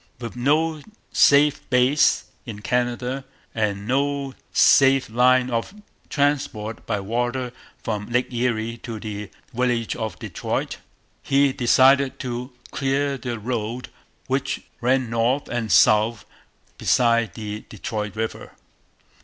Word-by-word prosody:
With 120 -1 -7
no 155 +5 +1 0.3
safe 145 +1 +5
base 130 +3 +3 0.2
in 105 -4 -8
Canada, 125 +2 -1 0.3
and 105 -2 -2
no 140 +1 0 0.2
safe 135 -3 +5
line 125 +2 +4
of 115 - -2 0.3
transport 140 -7 -1
by 105 -3 0
water 120 +4 -2 0.3
from 105 -3 -3
Lake 125 +1 0
Erie 115 -1 -1
to 115 -1 -7
the 105 -1 -6 0.2
village 120 -2 0
of 110 -6 -4
Detroit, - - -3 0.4
he 140 0 +2
decided 130 +2 +4
to 125 +1 -5 0.2
clear 140 +1 0
the 120 -2 -4
road 115 +2 -4 0.4
which 135 +1 -1 0.2
ran 130 +1 +2
north 120 +5 +1
and 115 -3 -2
south 110 +1 +4 0.5
beside 115 -2 +2
the 105 -2 -5
Detroit 105 +1 -4
river. 110 0 -4
120 Hz, 115 wpm, -23 LUFS, 110-135 Hz, 0.5 s, safe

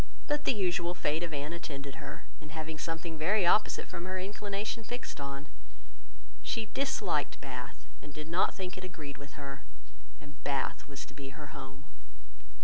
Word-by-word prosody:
But 295 0 +2
the - - +7
usual 180 -4 +3
fate 155 -1 +3
of 170 -1 0
Anne 145 +2 0
attended 140 -5 -4
her, 140 -1 -5 0.2
in 155 - -8
having 160 0 -2
something 165 0 -1
very 185 +5 +5
opposite 210 +5 +6
from 175 -1 -4
her 185 0 0
inclination 205 +3 -1
fixed 245 - -3
on. 140 +1 -2 1.0
She 230 -2 +1
disliked 205 - +3
Bath, 130 -1 -5 0.2
and 145 - -8
did 155 +2 -5
not 170 +3 +4
think 185 -1 -2
it - - -8
agreed 155 -6 -5
with 140 -1 -8
her; 140 -1 -5 0.6
and 145 -4 -12
Bath 140 -1 +1
was 140 -2 -4
to - - -12
be 140 0 -6
her 150 -2 -6
home. 135 0 -6
155 Hz, 170 wpm, -34 LUFS, 140-185 Hz, 1.0 s, the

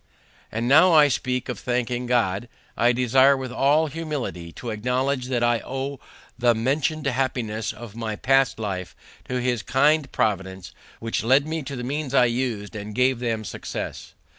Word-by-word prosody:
And 115 +2 -2
now 160 +7 +6
I 150 -2 +7
speak 125 -1 -1
of 125 -5 -4
thanking 125 0 -2
God, 120 -2 0 0.3
I 120 +1 +3
desire 130 +3 +4
with 130 -2 -5
all 145 +5 +3
humility 145 - -5
to 120 - -6
acknowledge 125 +4 -1
that 125 -2 0
I 120 -1 +3
owe 135 +1 -5 0.4
the 120 -1 +4
mentioned 145 +6 0
happiness 125 -5 -1
of 115 -2 -11
my 110 -2 -3
past 135 +3 +2
life 95 -5 -4 0.3
to 125 0 -1
His 120 -2 0
kind 145 +6 +2
providence, 95 -5 -2 0.3
which 115 -1 -2
lead 135 +5 +4
me 160 +1 -3
to 140 0 -6
the 125 - -5
means 140 +1 -3
I 125 - +6
used 115 -4 -2
and 105 0 -6
gave 125 0 +2
them 115 -3 -2
success. - - -6
125 Hz, 165 wpm, -24 LUFS, 115-135 Hz, 0.4 s, I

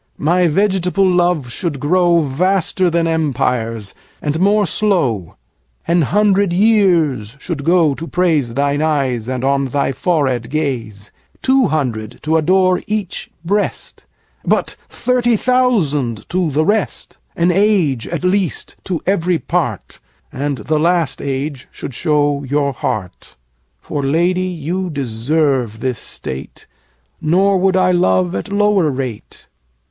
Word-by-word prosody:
10 - - -7
My 175 +2 +3
vegetable 190 +2 +1
love 175 -8 +1
should 150 0 -3
grow 175 +3 +3
Vaster 185 +5 +1
than 170 0 +1
empires, 125 -9 -1 0.3
and 150 +1 -2
more 205 +2 +3
slow; 150 - 0 0.5
An 170 0 +3
hundred 200 +3 +2
years 175 - +2
should 155 -3 -4
go 165 -2 +3
to 165 +4 -7
praise 155 -11 0
Thine 140 +1 +1
eyes 135 -7 0
and 130 -1 -3
on 140 0 +1
thy 140 +1 -1
forehead 130 -5 0
gaze; 120 -9 -3 0.3
Two 265 -3 +3
hundred 120 - -2
to 155 +1 +1
adore 185 +3 +3
each 210 -4 -3 0.2
breast, 205 +4 -2 0.3
15 - - -7
But - - +1
thirty 245 -2 +1
thousand 175 - +1
to 180 -2 0
the 155 +2 +1
rest; 210 +1 -1 0.2
An 170 +1 +2
age 175 - +2
at - - -4
least 185 -1 -1
to 180 -5 -2
every 180 -2 +1
part, 130 - -3 0.3
And 140 +1 -2
the 150 +7 -1
last 165 -3 +1
age 140 0 -4
should 135 - -8
show 145 0 +1
your 140 +1 0
heart. 105 -6 -5 0.4
For, 145 - -4
Lady, 170 +6 +1
you 180 +1 -3
deserve 135 -3 -1
this 125 0 -2
state, 65 +1 -7 0.6
Nor 190 +5 +3
would 190 0 +2
I 185 0 +3
love 95 - +2
at 100 - -4
lower 205 -5 +2
rate. 130 -5 -6
155 Hz, 135 wpm, -17 LUFS, 135-185 Hz, 0.6 s, My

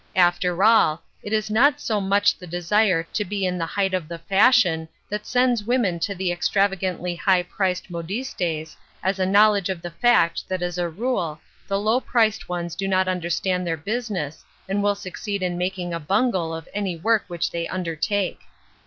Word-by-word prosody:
After 180 0 +2
all, 175 -8 +4 0.2
it 205 - -7
is 215 -1 0
not 285 +7 +4
so 215 -7 -1
much 200 +1 +3
the 180 - -12
desire 175 +1 +2
to 210 - 0
be 200 0 -2
in 180 -1 -1
the 165 - -1
height 195 +1 -1
of 180 -4 -1
the 170 - -6
fashion 185 -2 +3 0.2
that 210 0 -4
sends 245 -3 +2
women 215 -7 +1
to 200 +4 -2
the 185 -1 -1
extravagantly 185 -1 0
high 180 0 +2
priced 185 0 -2
modistes^ 170 -3 -3 0.3
as 190 +1 0
a 185 - +1
knowl 210 +2 +6
edge 195 -2 -2
of 185 -3 -4
the 175 - -5
fact 170 -3 +2
that 185 -1 -2
as 175 0 -3
a 175 -1 0
rule, 175 -5 -2 0.3
the 195 - 0
low 220 +4 +2
priced 220 -5 +1
ones 175 -1 -3
do 195 +2 -2
not 190 -1 +2
understand 180 0 -1
their 165 -1 -1
business, 200 - -4 0.2
and 195 +2 0
will 205 0 +2
succeed 200 0 -5
in 180 -1 -1
making 180 0 -3
a 165 - -2
bungle 190 0 0
of 165 0 -6
any 200 -4 -2
work 220 +5 +2
which 175 -2 -2
they 170 0 -3
undertake. 185 +2 -2
185 Hz, 190 wpm, -23 LUFS, 175-205 Hz, 0.3 s, knowl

